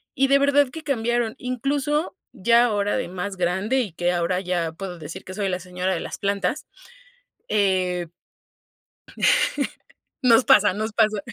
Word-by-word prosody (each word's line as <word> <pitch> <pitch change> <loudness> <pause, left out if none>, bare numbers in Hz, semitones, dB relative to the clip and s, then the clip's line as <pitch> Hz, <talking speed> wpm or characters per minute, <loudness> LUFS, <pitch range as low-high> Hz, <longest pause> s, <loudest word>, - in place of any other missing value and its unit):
y 270 +1 +3
de 275 +1 +5
verdad 280 -1 +3
que 320 +3 -9
cambiaron, 240 -4 0
incluso, 280 +6 -1 0.2
ya 235 +2 +4
ahora 205 0 0
de 255 - -2
más 190 +2 -5
grande 190 +9 0
y 205 -9 -3
que 175 +1 0
ahora 175 +2 0
ya 175 -3 -2
puedo 180 -1 -7
decir 165 +5 -8
que 185 - -8
soy 200 -2 -1
la 180 0 -2
señora 180 +1 -3
de - - -3
las - - -6
plantas, 200 +7 -1 0.8
eh, 185 -4 +1 2.2
nos 240 0 +5
pasa, 205 -2 +5
nos 215 +1 -3
pasa. 215 -2 +2
205 Hz, 155 wpm, -23 LUFS, 180-245 Hz, 2.2 s, de